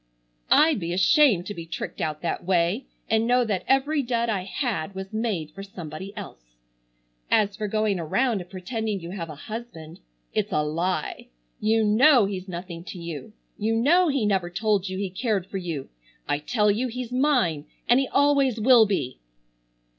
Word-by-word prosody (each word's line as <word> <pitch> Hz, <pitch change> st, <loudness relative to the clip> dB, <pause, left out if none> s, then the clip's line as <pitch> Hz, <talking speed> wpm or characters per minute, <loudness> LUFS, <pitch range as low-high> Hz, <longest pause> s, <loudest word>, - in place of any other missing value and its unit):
I'd 310 Hz, -5 st, +5 dB
be 170 Hz, -1 st, -3 dB
ashamed 190 Hz, -, +4 dB
to 205 Hz, -, -5 dB
be 170 Hz, -3 st, -8 dB
tricked -, -, -5 dB
out 155 Hz, 0 st, -3 dB
that 170 Hz, -, -2 dB
way 180 Hz, +7 st, +1 dB, 0.2 s
and 225 Hz, +1 st, +2 dB
know 245 Hz, 0 st, +3 dB
that 200 Hz, -5 st, -1 dB
every 280 Hz, +3 st, +2 dB
dud 235 Hz, -2 st, -1 dB
I 195 Hz, -4 st, -1 dB
had 200 Hz, -, -3 dB
was 190 Hz, +2 st, -7 dB
made 210 Hz, -9 st, -2 dB
for 195 Hz, -, -9 dB
somebody 190 Hz, -1 st, -8 dB
else. -, -, -10 dB, 0.7 s
As 205 Hz, -2 st, +2 dB
for 215 Hz, -, -3 dB
going 215 Hz, -2 st, 0 dB
around 220 Hz, +6 st, 0 dB
and 175 Hz, -, -11 dB
pretending 210 Hz, +2 st, -3 dB
you 170 Hz, 0 st, -8 dB
have 170 Hz, -4 st, -5 dB
a 155 Hz, -, -7 dB
husband—it's 155 Hz, -, -7 dB
a 150 Hz, -, +1 dB
lie. 170 Hz, +5 st, -2 dB, 0.3 s
You 220 Hz, +1 st, +2 dB
know 235 Hz, +3 st, +5 dB
he's 195 Hz, -1 st, -5 dB
nothing 175 Hz, -1 st, -7 dB
to 190 Hz, -, -8 dB
you. 170 Hz, +3 st, -7 dB, 0.3 s
You 220 Hz, +2 st, +1 dB
know 335 Hz, +10 st, +4 dB
he 275 Hz, -7 st, +1 dB
never 190 Hz, -4 st, +1 dB
told 200 Hz, 0 st, 0 dB
you 185 Hz, -, -4 dB
he 195 Hz, -1 st, -3 dB
cared 200 Hz, -2 st, -1 dB
for 195 Hz, -, -5 dB
you. 165 Hz, -7 st, -5 dB, 0.4 s
I 145 Hz, 0 st, 0 dB
tell 210 Hz, +5 st, +2 dB
you 235 Hz, +5 st, 0 dB
he's 250 Hz, 0 st, -6 dB
mine, 250 Hz, -, +1 dB, 0.2 s
and 240 Hz, +2 st, +5 dB
he 270 Hz, -, 0 dB
always 280 Hz, -4 st, +3 dB
will 230 Hz, -1 st, +6 dB
be." 140 Hz, -11 st, -2 dB
200 Hz, 175 wpm, -25 LUFS, 175-235 Hz, 0.7 s, will